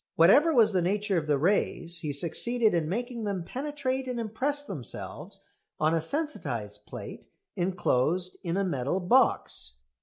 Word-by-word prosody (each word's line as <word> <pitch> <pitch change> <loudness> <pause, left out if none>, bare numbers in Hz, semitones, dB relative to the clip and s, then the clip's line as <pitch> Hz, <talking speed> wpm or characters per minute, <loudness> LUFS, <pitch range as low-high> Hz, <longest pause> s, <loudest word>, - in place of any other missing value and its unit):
Whatever 275 - +6
was 225 -7 +4
the 185 - +2
nature 200 +1 +1
of 155 - -7
the 145 -1 +3
rays 170 0 +1
he 150 -2 -3
succeeded 215 - +2
in 160 -3 0
making 240 +3 -3
them 200 -4 -2
penetrate 265 - -3
and 250 -1 -3
impress 260 +7 -1
themselves 150 - -5 0.3
on 155 +1 +2
a 165 - +1
sensitised 145 - -4
plate - - -8 0.3
enclosed 175 -1 0
in 175 -1 -2
a 200 - +2
metal 145 -1 -1
box. 185 - +2
185 Hz, 150 wpm, -28 LUFS, 160-240 Hz, 0.3 s, Whatever